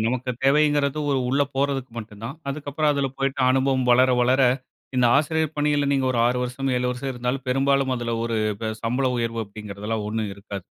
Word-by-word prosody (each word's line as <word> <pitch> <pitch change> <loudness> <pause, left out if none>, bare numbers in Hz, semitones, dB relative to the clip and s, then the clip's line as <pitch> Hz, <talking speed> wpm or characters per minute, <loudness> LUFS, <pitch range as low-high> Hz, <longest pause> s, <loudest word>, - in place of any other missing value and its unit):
நமக்கு 125 +1 -1
தேவைங்கிறது 145 +1 +3
ஒரு 135 - +2
உள்ள 140 +2 +2
போறதுக்கு 135 -2 -1
மட்டும் 105 -1 -9
தான். 135 +6 -5
அதுக்கப்புறம் 145 +1 -1
அதில 140 -1 0
போய்ட்டு 135 0 -1
அனுபவம் 130 -1 +2
வளர, 130 +1 +5
வளர 130 +2 +3 0.6
இந்த 125 -1 +4
ஆசிரியர் 160 +1 0
பணியில 145 -1 +1
நீங்க 135 -1 +1
ஒரு 120 - -1
6 125 +1 +1
வருஷம், 130 +2 -3
7 125 0 0
வருஷம் 130 +2 -4
இருந்தாலும், 125 +2 -3
பெரும்பாலும் 135 0 +2
அதில 120 -1 -3
ஒரு 115 -1 -1 0.5
சம்பள 125 +3 0
உயர்வு 115 -1 -2
அப்படிங்கிறதெல்லாம் 105 +1 -5
ஒண்ணும் 110 -1 -2
இருக்காது. 100 -2 -8
130 Hz, 175 wpm, -24 LUFS, 120-140 Hz, 0.6 s, வளர